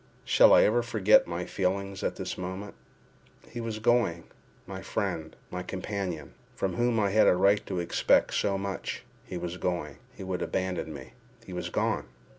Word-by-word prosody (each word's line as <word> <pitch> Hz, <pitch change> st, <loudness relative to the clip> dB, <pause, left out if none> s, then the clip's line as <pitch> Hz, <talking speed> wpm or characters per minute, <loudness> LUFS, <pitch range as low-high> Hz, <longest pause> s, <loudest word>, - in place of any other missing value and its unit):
Shall -, -, +6 dB
I -, -, +8 dB
ever 120 Hz, +3 st, +3 dB
forget 110 Hz, -3 st, +4 dB
my 85 Hz, +1 st, -3 dB
feelings 100 Hz, +1 st, -2 dB
at -, -, -1 dB
this -, -, -4 dB
moment? 95 Hz, +3 st, -6 dB, 0.7 s
He 120 Hz, -, -6 dB
was 115 Hz, -2 st, -3 dB
going—my 110 Hz, -8 st, -2 dB
friend, 80 Hz, -1 st, -3 dB, 0.2 s
my 90 Hz, -, -3 dB
companion, 95 Hz, -3 st, -4 dB, 0.2 s
from 95 Hz, -2 st, -1 dB
whom 120 Hz, +3 st, +1 dB
I 100 Hz, -2 st, +2 dB
had 110 Hz, +2 st, +5 dB
a -, -, +6 dB
right 100 Hz, +3 st, +3 dB
to 95 Hz, -, -3 dB
expect 85 Hz, 0 st, +2 dB
so 100 Hz, -1 st, +1 dB
much—he 95 Hz, -1 st, -6 dB
was 85 Hz, 0 st, -4 dB
going—he 85 Hz, -2 st, -4 dB
would 95 Hz, -1 st, -3 dB
abandon 95 Hz, -3 st, -2 dB
me—he 70 Hz, +5 st, -12 dB
was 90 Hz, 0 st, -4 dB
gone! -, -, -1 dB
95 Hz, 155 wpm, -28 LUFS, 90-105 Hz, 0.7 s, I